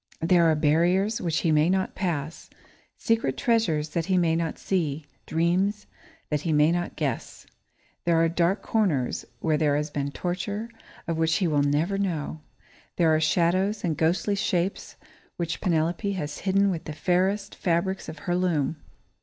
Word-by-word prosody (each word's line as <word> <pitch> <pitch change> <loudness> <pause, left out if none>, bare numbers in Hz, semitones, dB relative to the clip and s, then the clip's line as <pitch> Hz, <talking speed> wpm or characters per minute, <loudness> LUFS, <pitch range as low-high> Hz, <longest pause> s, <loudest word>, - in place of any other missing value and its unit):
There 170 +1 +4
are 160 - +3
barriers 175 +8 +2
which 165 -2 0
he 165 - +2
may 155 +2 +4
not 190 0 0
pass, 165 -5 -3 0.5
secret 225 - 0
treasures 165 - +1
that 165 +1 -2
he 190 -1 +2
may 165 -2 +2
not 165 -1 -2
see, 155 -6 -2 0.2
dreams 185 +6 +1 0.5
that 150 -1 0
he 165 - -1
may 150 +1 +4
not 175 0 -2
guess. 140 -7 -4 0.6
There 170 -1 +2
are 165 0 +4
dark 175 +4 0
corners 170 - 0 0.2
where 155 -2 +1
there 150 -2 +2
has 150 +1 -2
been 140 -1 -2
torture, 200 +8 -4 0.4
of 165 -1 -1
which 160 0 +2
he 185 - +1
will 150 -3 +2
never 155 +8 +1
know. 160 -5 -2 0.5
There 165 -2 +3
are 155 - +3
shadows 185 +6 +1
and 165 -4 0
ghostly 170 +6 +1
shapes 190 -2 -1 0.4
which 170 -1 -3
Penelope 175 +3 0
has 150 -6 -4
hidden 195 +1 +2
with 165 -3 -4
the 155 - -5
fairest 190 +5 0
fabrics 180 +2 -1
of 160 - -8
her 175 - 0
loom. 165 -4 0
170 Hz, 165 wpm, -26 LUFS, 155-190 Hz, 0.6 s, There